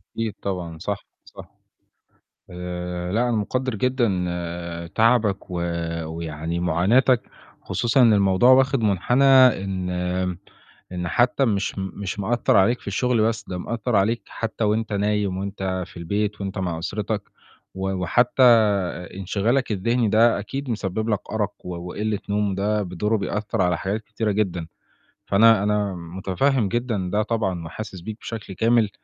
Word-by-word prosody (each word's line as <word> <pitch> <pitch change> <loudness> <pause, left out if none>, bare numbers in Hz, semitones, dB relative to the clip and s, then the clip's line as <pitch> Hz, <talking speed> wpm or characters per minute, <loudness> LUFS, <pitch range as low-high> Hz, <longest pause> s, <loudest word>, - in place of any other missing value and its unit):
أكيد 115 -2 -2
طبعًا، 90 -4 -4
صح، 100 +2 -4 0.2
صح. - - -13 1.0
آآ 90 0 -5
لأ، 120 +3 +2
أنا 120 - +1
مُقدّر 130 +4 -1
جدًا 125 +2 +1 0.9
تعبك 110 -4 +2
و 90 - -5 0.5
ويعني 80 +1 -4
مُعاناتك، 105 +10 +3 0.4
خصوصًا 120 +2 +2
إن 115 -2 +6
الموضوع 100 +4 +4
واخِد 135 0 +4
مُنحنى 110 +6 +2 0.4
إن 95 -2 -3
آمم 90 0 -2 0.5
إن 90 -1 -3
حتّى 125 +6 +2
مش 100 -3 -1
مش 95 +2 -5
مأثّر 115 +3 +1
عليك 115 +6 +3
في - - -18
الشُغل 115 +4 +1
بس، 110 0 0
ده 90 - -4
مأثّر 115 +3 -2
عليك 110 +4 +1
حتّى 115 0 -3
وأنت 110 +1 0
نايم 100 -1 0
وأنت 95 -2 -3
في - - -18
البيت 100 +4 -2
وأنت 95 0 -4
مع 90 -3 -2
أسرتك، 100 +4 -3 0.5
و 95 0 -2
وحتى 95 +8 +2
آآ 100 -7 +4
انشغالك 105 +6 0
الذهني 115 +3 +1
ده 115 +1 +4
أكيد 135 +6 -5
مسبب 110 +1 -2
لك 105 -3 +1
أرَق - - -1
و 90 -1 -4
وقلِّة 100 +4 -3
نوم 100 -1 0
ده 105 +2 0
بدوره 105 +5 -1
بيأثّر 100 0 -2
على 90 -2 +1
حاجات 100 +6 -2
كتيرة 110 0 -2
جدًا، 90 -5 -1 0.6
فأنا 110 0 +5
أنا 105 -2 0
مُتفهّم 95 +8 0
جدًا 110 -4 -2
ده 105 - +3
طبعًا 95 -8 -2
وحاسس 95 +1 -7
بيك 110 +3 -6
بشكل 110 -4 -6
كامل، 115 +1 +3
100 Hz, 145 wpm, -23 LUFS, 95-115 Hz, 1.0 s, إن